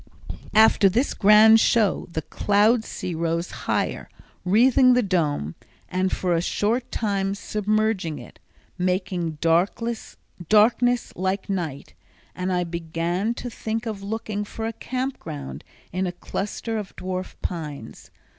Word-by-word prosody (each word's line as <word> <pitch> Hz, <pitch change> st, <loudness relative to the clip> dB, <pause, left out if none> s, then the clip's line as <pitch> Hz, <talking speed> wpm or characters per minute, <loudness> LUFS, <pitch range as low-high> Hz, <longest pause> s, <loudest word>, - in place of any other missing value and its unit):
After 215 Hz, -2 st, +6 dB
this 240 Hz, +9 st, +1 dB
grand 215 Hz, +2 st, +7 dB
show 220 Hz, -4 st, +2 dB
the 160 Hz, -2 st, -3 dB
cloud 215 Hz, +3 st, +2 dB
sea 185 Hz, -5 st, -5 dB
rose 165 Hz, +1 st, -2 dB
higher, -, -, -2 dB, 0.3 s
wreathing 250 Hz, +6 st, +5 dB
the 250 Hz, 0 st, +3 dB
Dome, 150 Hz, -, 0 dB, 0.4 s
and 185 Hz, +1 st, 0 dB
for 180 Hz, -2 st, 0 dB
a 165 Hz, -, +2 dB
short 225 Hz, +7 st, -1 dB
time 195 Hz, -3 st, -1 dB
submerging 210 Hz, -5 st, -1 dB
it, -, -, -12 dB, 0.4 s
making 180 Hz, -3 st, -1 dB
darkness 195 Hz, +8 st, 0 dB, 1.0 s
like 190 Hz, +2 st, -2 dB
night, 160 Hz, -, -4 dB, 0.4 s
and 185 Hz, +1 st, -3 dB
I 180 Hz, -1 st, +1 dB
began 170 Hz, +5 st, -2 dB
to 245 Hz, -, -5 dB
think 225 Hz, +1 st, -4 dB
of 215 Hz, -3 st, -4 dB
looking 210 Hz, 0 st, -3 dB
for 220 Hz, +2 st, -6 dB
a 225 Hz, -, -3 dB
camp 260 Hz, +3 st, -4 dB
ground 145 Hz, -4 st, -7 dB, 0.3 s
in 185 Hz, +1 st, 0 dB
a -, -, -2 dB
cluster 210 Hz, +5 st, -4 dB
of 200 Hz, -2 st, -8 dB
dwarf 185 Hz, 0 st, -5 dB
pines. 150 Hz, -, -6 dB
195 Hz, 130 wpm, -24 LUFS, 175-220 Hz, 1.0 s, grand